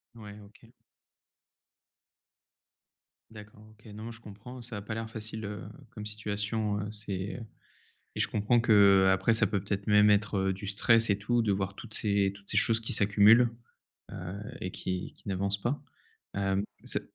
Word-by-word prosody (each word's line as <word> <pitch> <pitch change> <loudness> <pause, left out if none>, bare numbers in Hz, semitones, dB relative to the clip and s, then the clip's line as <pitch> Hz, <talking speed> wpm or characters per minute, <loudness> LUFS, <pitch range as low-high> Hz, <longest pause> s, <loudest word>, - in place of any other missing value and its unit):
Ouais, 105 -2 -11
OK. 100 +1 -19 2.6
D'accord, 105 0 -13
OK. 110 0 -24
Non 110 +1 -9
mais 115 - -6
je 115 - -12
comprends, 115 +4 -11
ça 115 -2 -7
a 100 - -6
pas 110 - -6
l'air 115 0 -5
facile, 110 -1 -6
heu, 105 0 -6 0.3
comme 105 - -8
situation, 105 0 -2
heu, 105 - -5
c'est, 100 -2 -5
heu - - -8 0.7
et - - -3
je - - +2
comprends 110 +3 +1
qu'après 100 -1 +4
ça - - +4
peut 100 - -1
peut-être 100 0 -4
même 105 0 +5
être, 105 0 +2
heu, - - +1
du 100 +2 -8
stress 115 +2 +4
et 100 - +2
tout 120 +3 0
de 110 - 0
voir 95 0 -2
toutes 110 +2 -7
ces 100 -2 +2
toutes 100 0 -17
ces 105 - +1
choses 110 +2 +4
qui 115 - 0
s'accumulent, 105 +4 +5 0.6
heu - - -7 0.4
et 95 - -4
qui 90 0 -5
qui - - -14
n'avancent 100 +1 0
pas, 125 +8 -2 0.5
hem, 100 0 0 0.2
ça - - 0
105 Hz, 175 wpm, -29 LUFS, 100-110 Hz, 2.6 s, même